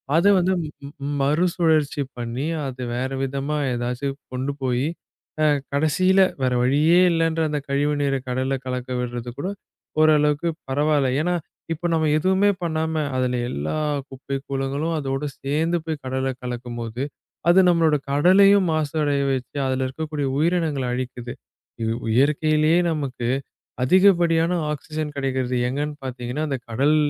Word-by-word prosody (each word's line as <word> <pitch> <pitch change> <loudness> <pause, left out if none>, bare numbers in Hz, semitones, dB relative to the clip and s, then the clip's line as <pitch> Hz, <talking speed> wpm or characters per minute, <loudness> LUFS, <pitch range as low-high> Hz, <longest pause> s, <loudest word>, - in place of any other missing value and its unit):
அதை 170 +5 +5
வந்து 185 +1 +2
ம் 145 -1 -10
ம - - -2
மறுசுழற்சி 160 -1 +2 0.2
பண்ணி, 120 +4 -3 0.2
அது 130 -1 -6
வேற 130 +2 -1
விதமா 140 +3 -2 0.2
எதாச்சு 125 +3 -2 0.3
கொண்டு 130 +3 -2
போயி, 130 +2 0 0.5
அ 155 - +4 0.3
கடைசியில 185 +6 +3 0.2
வேற 125 - +2
வழியே 150 +7 +4
இல்லைன்ற 165 0 +1
அந்த 150 -1 -1
கழிவு 145 +2 +1
நீரை 135 -1 +1
கடல்ல 130 +2 -1
கலக்கவிடுறது 125 -1 -3
கூட 180 - -2 0.5
ஒரு 155 0 +6
அளவுக்குப் 150 +3 0
பரவால்ல. 145 0 +2
ஏன்னா 180 +2 +1 0.4
இப்ப 175 +2 -3
நம்ம 160 -1 +2
எதுவுமே 190 +5 +3
பண்ணாம, 160 -1 -1 0.2
அதுல 125 -1 0
எல்லா 75 - -3 0.3
குப்பை 135 +1 -6
கூளங்களும் 140 +4 -2
அதோட 135 0 -2 0.2
சேர்ந்து 160 +5 0
போய் 155 -3 -4
கடல்ல 130 +1 -1
கலக்கும்போது, 120 -1 -4 0.5
அது 185 +2 +7
நம்மளோட 165 -3 +3 0.2
கடலையும் 190 +6 +5
மாசு 155 -2 -1
அடைய 145 -1 +1
வச்சு, 130 +2 -5
அதுல 130 0 0
இருக்கக்கூடிய 150 +1 -3
உயிரினங்களை 155 -5 +1
அழிக்குது. 125 -1 -5 0.5
இ - - 0 0.3
இயற்கையிலயே 155 +4 +3
நமக்கு 135 -6 -3 0.6
அதிகப்படியான 170 -1 +4 0.2
ஆக்ஸிஜன் 155 0 -5
கிடைக்கிறது 130 -2 -1
எங்கன்னு 145 +3 -2
பாத்தீங்கன்னா, 125 +3 -3
அந்தக் 130 -3 -4
கடல் 140 +6 +3
145 Hz, 135 wpm, -23 LUFS, 130-160 Hz, 0.6 s, அது